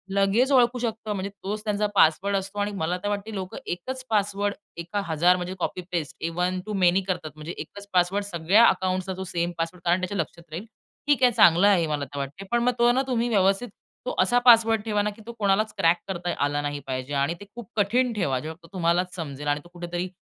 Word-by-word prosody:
लगेच 200 +7 +3
ओळखू 250 -2 +4
शकतो. 220 -2 -3
म्हणजे 195 0 -3
तोच 210 +2 -4
त्यांचा 210 -1 0
पासवर्ड 195 +4 +4
असतो 195 +2 -5
आणि 205 +1 0
मला 175 +3 0
तर - - -1
वाटते 205 +2 -3
लोकं 190 -1 -5
एकच 255 +9 -5
पासवर्ड 205 -1 0 0.2
एका 170 +5 -3
हजार 170 +2 +3
म्हणजे 180 +1 -4
copy 180 - -2
paste 165 -2 -3
one 180 +1 0
two 215 - -5
many 180 +2 +4
करतात. 180 -5 -3
म्हणजे 155 +3 -7
एकच 200 0 -9
पासवर्ड 185 +3 +2
सगळ्या 195 +4 +4
अकाउंट्सचा 185 0 0
तो 190 - -4
सेम 170 0 0
पासवर्ड 170 +1 -4
कारण 175 +2 +2
त्याच्या 190 +2 -3
लक्षात 170 +1 -4
राहील. 170 +7 -5 0.4
ठीक 285 -3 +3
आहे 245 - +6
चांगलं 175 -1 +6
आहे 195 -4 +5
हे, 160 - 0
मला 145 -2 -2
तर 140 +2 -10
वाटते. 140 +8 -5
पण 240 0 +2
मग 250 - +3
तो 240 0 +5
ना 255 +2 +2
तुम्ही 240 -2 0
व्यवस्थित 200 +3 +2 0.4
तो - - -3
असा 190 +7 +4
पासवर्ड 225 -2 +6
ठेवा 210 -2 +1
ना 210 - 0
की 210 +1 -11
तो 235 - -5
कोणालाच 210 +1 +2
क्रॅक 170 -2 +4
करता 175 -2 -3
आला 145 0 -1
नाही 145 0 -3
पाहिजे. 130 +2 -4
आणि 140 +3 +1
ते 205 - -10
खूप 240 -5 -9
कठीण 235 +4 +2
ठेवा. 145 -11 0
जेव्हा 160 +4 -6
तो 165 - -14
तुम्हालाच 180 0 0
समजेल 150 -4 -6
आणि 145 0 +1
तो 175 - -16
कुठेतरी 175 +1 -4
190 Hz, 220 wpm, -25 LUFS, 170-210 Hz, 0.4 s, आहे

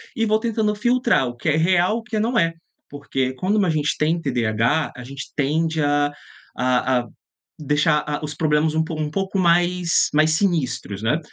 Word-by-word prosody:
e 225 - +1
vou 215 0 +2
tentando 220 -2 0
filtrar 240 - +1
o 120 - -6
que - - -6
é 150 - +2
real 180 +5 +2
e - - -3
o - - -12
que 230 -2 -4
não 230 +2 +1
é. 165 -3 +1 0.4
Porque 135 -2 -3
quando 200 +8 +1
a 185 - +1
gente 150 -2 0
tem 160 +3 +1
TDAH, 120 +1 0
a 125 - -8
gente 135 +2 -9
tende 160 +3 0
a 145 0 +1 0.5
a 125 0 +1
a 120 - -11 0.6
deixar, 150 +1 +2
ah, 145 0 -2
os 150 0 -4
problemas 155 0 +1
um 160 0 +1
pouco 160 -1 -4
um 150 - -4
pouco 195 +1 -2
mais, 175 0 +2
mais 155 +1 +4
sinistros, 155 - -1
né. 120 +8 +1
155 Hz, 195 wpm, -21 LUFS, 145-185 Hz, 0.6 s, mais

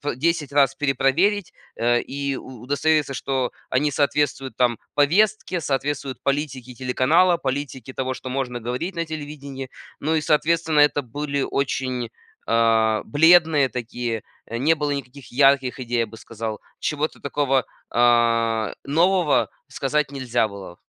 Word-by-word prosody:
п 145 -4 -3
10 155 -1 0
раз 135 -2 +4
перепроверить, 150 +8 +1 0.2
э, 120 +1 +2
и 140 -1 -3
у 125 -3 -10
удостовериться, 145 +1 +1
что 130 -2 -1 0.2
они 145 +3 +1
соответствуют 140 -2 0
там 120 -3 +2 0.2
повестке, 185 +4 +2
соответствуют 135 -1 -2
политике 135 -3 -2
телеканала, 135 +9 +3
политике 135 -3 -4
того, 130 0 -2
что 130 - -7
можно 125 -2 -2
говорить 125 +11 -4
на 170 - 0
телевидении. 140 -4 -7 0.3
Ну 160 +2 0
и - - +2
соответственно 160 0 +2
это 145 -1 +4
были 140 +3 -3
очень, 130 -4 -2 0.4
а, 115 -1 +3
бледные 160 0 +5
такие, 120 -1 -4 0.3
не 135 +8 +2
было 150 -2 -2
никаких 140 -2 -6
ярких 135 -1 +3
идей, 120 -1 -2
я 115 - +1
бы 115 - -12
сказал. 110 -1 -6 0.2
Чего-то 150 0 -2
такого, 135 -2 +1 0.3
а, 115 -2 +2
нового 170 +1 +2 0.2
сказать 150 -2 -1
нельзя 125 -4 0
было. 95 -4 -10
135 Hz, 135 wpm, -23 LUFS, 125-150 Hz, 0.4 s, бледные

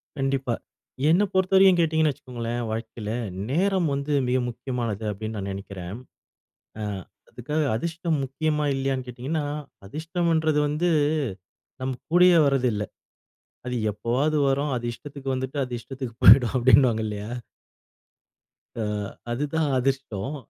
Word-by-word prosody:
கண்டிப்பா. 135 -3 0 0.6
என்ன 175 +6 +5
பொறுத்தவரைக்கும், 190 -1 +5
கேட்டீங்கன்னு 160 -2 +3
வச்சுக்கோங்களேன். 120 -2 -5
வாழ்க்கையில 110 -1 -4 0.4
நேரம் 185 +2 +2
வந்து 140 +2 -2 0.2
மிக 125 +1 +2
முக்கியமானது 120 -3 -3
அப்படின்னு, 110 +2 -5
நான் 100 -1 -4
நெனைக்கிறேன். 95 0 -7 0.8
அ - - -2 0.5
அதுக்காக 150 +6 -2
அதிர்ஷ்டம் 165 +4 -1
முக்கியமா, 150 +3 -1
இல்லையான்னு 135 -1 -1
கேட்டீங்கன்னா, 135 +6 -3 0.4
அதிர்ஷ்டம்ன்றது 160 - 0
வந்து 150 +4 0 0.9
நம்ம 130 0 -1 0.2
கூடயே 175 0 +7
வர்றது 135 -2 +2
இல்லை. 105 -1 -2 0.8
அது 125 0 -2 0.2
எப்போவாவது 125 +9 0
வரும். 140 +2 +1
அது 120 -1 -3
இஷ்டத்துக்கு 140 +1 -8
வந்துட்டு, 130 +2 -4
அது 125 -1 -6
இஷ்டத்துக்கு 130 -2 -7
போயிடும், 125 -2 +8
அப்படின்னுவாங்க 125 -2 +5
இல்லையா? 105 0 -5 1.5
அ 115 - -3 0.5
அதுதான் 150 +5 0
அதிஷ்டோம். 135 -2 -1
135 Hz, 115 wpm, -25 LUFS, 120-155 Hz, 1.5 s, போயிடும்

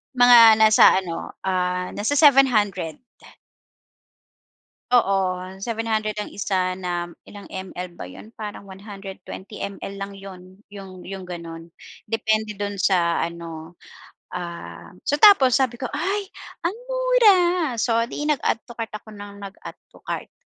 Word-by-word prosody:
Mga 245 -1 +8 0.2
nasa 215 0 +6 0.2
ano, 165 -2 -6
ah, 180 -1 -1
nasa 225 +8 -1
700. 225 - +4 1.9
Oo, 230 -6 +4 0.5
700 220 -1 -2
ang 210 - -5
isa 185 -2 -1
na 175 -1 -3 0.2
ilang 205 -1 -11
ML 180 -1 -6
ba 90 - -6
yun? 215 - -13
Parang 210 -1 -7
120mL 195 0 -8
lang 200 0 -6
yun, 190 0 -13
yung 190 -2 -10
yung 190 -1 -8
ganon, 165 -1 -9 0.3
depende 220 -1 -1
dun 205 -1 -4
sa 175 -4 +2
ano, 165 0 -6 0.6
ah 170 - -8
so 290 +1 0
tapos 275 - +7
sabi 245 -2 0
ko 255 - -7
ay 400 +2 -1 0.4
ang 345 - +1 0.2
mura! - - +4 0.4
So 230 0 +1
di 295 - -5
nag 300 -4 +1
add 225 - -1
to 240 - -11
cart 230 -1 -5
ako 215 +1 -13
ng 205 -1 -10
nag 195 - -7
add - - -9 0.2
to - - -18
cart, - - -4
200 Hz, 135 wpm, -23 LUFS, 180-230 Hz, 1.9 s, Mga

